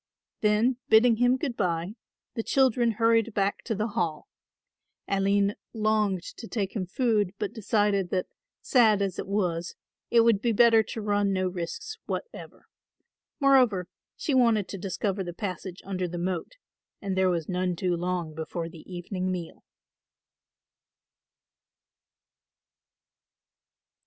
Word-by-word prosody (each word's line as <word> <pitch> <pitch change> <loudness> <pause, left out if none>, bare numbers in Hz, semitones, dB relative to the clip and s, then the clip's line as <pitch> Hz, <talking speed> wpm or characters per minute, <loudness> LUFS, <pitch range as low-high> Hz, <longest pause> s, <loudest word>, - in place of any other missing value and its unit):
Then 220 +4 +2
bidding 225 +1 +6
him 245 +2 +3
good 260 -3 -3
bye 170 +1 -1 0.4
the 230 - -2
children 245 -2 +2
hurried 230 0 +2
back 200 0 0
to 225 - -1
the 215 +3 -1
Hall. 165 -6 -2 0.8
Aline 200 +1 +2 0.2
longed 215 -4 +1
to 230 - -8
take 200 -3 -3
him 185 -4 -2
food 210 -2 +1
but 210 - -3
decided 205 -4 +1
that, 185 0 0 0.4
sad 220 -6 +4
as 190 -2 -3
it - - -4
was, 175 -4 -1 0.3
it 235 - +5
would 225 -3 +3
be 235 -1 +1
better 230 0 +6
to 220 +1 -6
run 205 -1 +1
no 185 -1 0
risks 180 - -5
whatever. - - -6 0.7
Moreover, 250 - +4 0.3
she 295 - -2
wanted 230 -6 +3
to 195 - -5
discover 195 +1 -2
the 175 -1 -6
passage 185 -2 -5
under 185 -2 -2
the 175 0 -6
moat 175 - -3 0.5
and 195 -2 -3
there 190 0 +3
was 170 -3 -1
none 180 -1 -1
too 180 +1 0
long 175 -2 -2
before 165 +2 -5
the 165 +2 -13
evening 185 +1 -3
meal. 175 -3 -6
200 Hz, 135 wpm, -27 LUFS, 180-225 Hz, 0.8 s, bidding